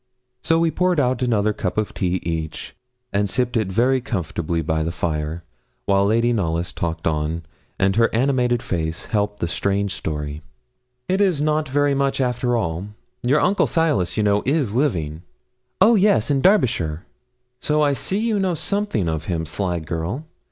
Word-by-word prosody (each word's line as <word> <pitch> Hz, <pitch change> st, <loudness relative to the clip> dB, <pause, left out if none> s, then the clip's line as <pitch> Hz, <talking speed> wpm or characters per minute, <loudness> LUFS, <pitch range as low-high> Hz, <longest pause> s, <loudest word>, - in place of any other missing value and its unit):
So 165 Hz, -, +2 dB
we 165 Hz, 0 st, +2 dB
poured 180 Hz, -1 st, +1 dB
out 130 Hz, -2 st, +1 dB
another 110 Hz, -4 st, +2 dB
cup 95 Hz, -1 st, -3 dB
of 110 Hz, -1 st, -1 dB
tea 90 Hz, -1 st, -1 dB
each, 80 Hz, -2 st, -4 dB, 0.4 s
and 100 Hz, 0 st, +1 dB
sipped 125 Hz, +3 st, 0 dB
it 110 Hz, -4 st, +1 dB
very 130 Hz, +6 st, +2 dB
comfortably 85 Hz, -7 st, -2 dB
by 80 Hz, 0 st, 0 dB
the 80 Hz, +2 st, -1 dB
fire, 80 Hz, 0 st, -3 dB, 0.4 s
while 100 Hz, 0 st, +3 dB
Lady 115 Hz, +3 st, +2 dB
Knollys 85 Hz, -5 st, -1 dB
talked 80 Hz, -1 st, -3 dB
on, 80 Hz, +1 st, -1 dB, 0.3 s
and 95 Hz, 0 st, +2 dB
her 115 Hz, 0 st, +4 dB
animated 125 Hz, -1 st, +1 dB
face 80 Hz, -2 st, -3 dB
helped 105 Hz, -1 st, -1 dB
the 85 Hz, -, +1 dB
strange 100 Hz, +3 st, 0 dB
story. 75 Hz, -1 st, -4 dB, 0.7 s
'It 190 Hz, +2 st, +1 dB
is 185 Hz, -7 st, +2 dB
not 150 Hz, 0 st, 0 dB
very 145 Hz, +1 st, +2 dB
much, 140 Hz, 0 st, 0 dB
after 125 Hz, -1 st, +1 dB
all. 85 Hz, -2 st, -2 dB, 0.3 s
Your 135 Hz, +5 st, +2 dB
uncle 195 Hz, +2 st, +3 dB
Silas, 155 Hz, -, +1 dB
you 110 Hz, -, +2 dB
know, 105 Hz, 0 st, +3 dB
is 135 Hz, -5 st, 0 dB
living?' 85 Hz, -, 0 dB, 0.6 s
'Oh 230 Hz, -, +6 dB
yes, 200 Hz, -, +3 dB
in 135 Hz, -1 st, +2 dB
Derbyshire.' 100 Hz, -, +2 dB, 0.5 s
'So 150 Hz, 0 st, +1 dB
I 145 Hz, -1 st, +3 dB
see 190 Hz, +7 st, -2 dB
you 220 Hz, 0 st, +1 dB
do -, -, 0 dB
know 190 Hz, -2 st, +1 dB
something 200 Hz, -, -1 dB
of 80 Hz, -1 st, -2 dB
him, 85 Hz, -3 st, -2 dB
sly 90 Hz, +2 st, -2 dB
girl! 85 Hz, -, -4 dB
105 Hz, 175 wpm, -22 LUFS, 85-140 Hz, 0.7 s, Oh